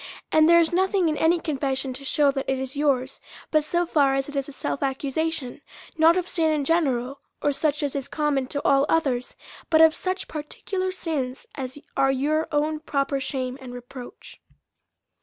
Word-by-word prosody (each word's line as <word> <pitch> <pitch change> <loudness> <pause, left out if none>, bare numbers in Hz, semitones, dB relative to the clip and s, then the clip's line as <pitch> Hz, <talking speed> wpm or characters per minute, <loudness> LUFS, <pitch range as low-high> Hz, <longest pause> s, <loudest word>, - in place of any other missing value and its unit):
And 315 +1 +5
there 340 - +7
is 335 0 +3
nothing 375 -1 +2
in 305 - -1
any 335 +2 +3
confession 270 -4 -2
to 265 +2 -9
shew 280 +1 +3
that 270 -1 -4
it 265 - +1
is 265 +1 -5
yours, 275 -3 0 0.3
but 310 -1 +3
so 345 +3 0
far 280 -5 +3
as 270 0 -1
it 290 - -9
is 275 0 -2
a - - -8
self 270 - -4
accusation, 280 +1 -2 0.3
not 330 +2 +5
of 360 -1 -1
sin 320 -3 +1
in 295 -2 0
general, 275 -5 0 0.2
or 290 - +1
such 300 +1 0
as 285 -1 -2
is 275 -2 -3
common 290 -4 0
to 285 +2 -4
all 275 +1 +4
others, 265 -7 0 0.3
but 315 - +4
of 320 0 +7
such 370 +2 -3
particular 370 +5 -4
sins 295 -8 -4
as 260 -1 -6 0.2
are 270 0 +3
your 300 +4 0
own 305 +1 0
proper 275 -2 -1
shame 260 -1 -3
and 250 -1 -8
reproach. 245 0 -11
290 Hz, 190 wpm, -24 LUFS, 270-320 Hz, 0.3 s, there